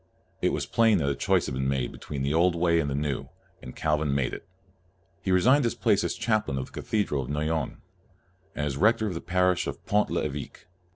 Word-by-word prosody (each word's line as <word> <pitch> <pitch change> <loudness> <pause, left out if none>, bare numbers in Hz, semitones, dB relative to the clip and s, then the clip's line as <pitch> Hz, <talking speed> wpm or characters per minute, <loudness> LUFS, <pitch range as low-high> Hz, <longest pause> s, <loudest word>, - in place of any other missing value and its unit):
It - - +2
was - - -2
plain 115 -3 +3
that 70 -5 0
a - - -2
choice 95 0 +1
must 65 -2 -3
be - - -1
made 65 -2 -1
between 70 -2 -6
the 70 +2 0
old 85 +2 +3
way 85 0 +2
and 75 - 0
the 70 - -2
new, 70 -1 -2 0.3
and 65 - -10
Calvin 75 -2 0
made 70 -3 0
it. - - -8 0.8
Fie - - -3
resigned 125 +10 +5
his 120 -1 0
place 100 -2 +2
as - - -1
chaplain 110 - 0
of 65 - -2
the - - -18
cathedral 100 -10 0
of 65 - -7
Noyon, 75 0 -2 0.7
and 75 - -2
r - - +1
as 70 -2 -2
rector 110 +5 +3
of 100 - -2
the 85 - -5
parish 90 0 +1
of - - -6
Pont 105 +1 +2
1'Eveque. 75 -5 -4
80 Hz, 225 wpm, -27 LUFS, 70-95 Hz, 0.8 s, resigned